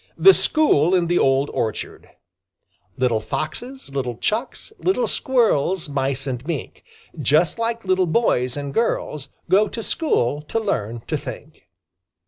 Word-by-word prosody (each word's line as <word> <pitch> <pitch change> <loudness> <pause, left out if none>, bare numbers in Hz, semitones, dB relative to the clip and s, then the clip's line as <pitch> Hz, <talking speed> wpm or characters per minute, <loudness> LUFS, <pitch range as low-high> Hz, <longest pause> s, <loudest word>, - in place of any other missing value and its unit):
THE 385 - +8
SCHOOL 185 - +3
IN 175 -2 +2
THE 175 +1 +2
OLD 135 +1 +2
ORCHARD 110 -1 -4 0.9
Little 125 -3 +2
Foxes, 245 - -5
little 125 -4 -3
Chucks, 235 - -3
Little 390 +6 +1
Squirrels, 190 - +1
Mice 135 -1 -1
and 125 -3 -4
Mink, 160 -6 -5 0.4
Just 155 +8 +2
like 230 -1 -2
little 185 -1 +2
boys 135 - +1
and 140 -1 -5
girls, 150 - -1 0.2
Go 205 +3 +4
to 225 +2 -6
school 145 - 0
to 155 +9 -2
learn 115 - -2
to 155 - -2
think. 155 -2 -10
155 Hz, 135 wpm, -22 LUFS, -, 0.9 s, THE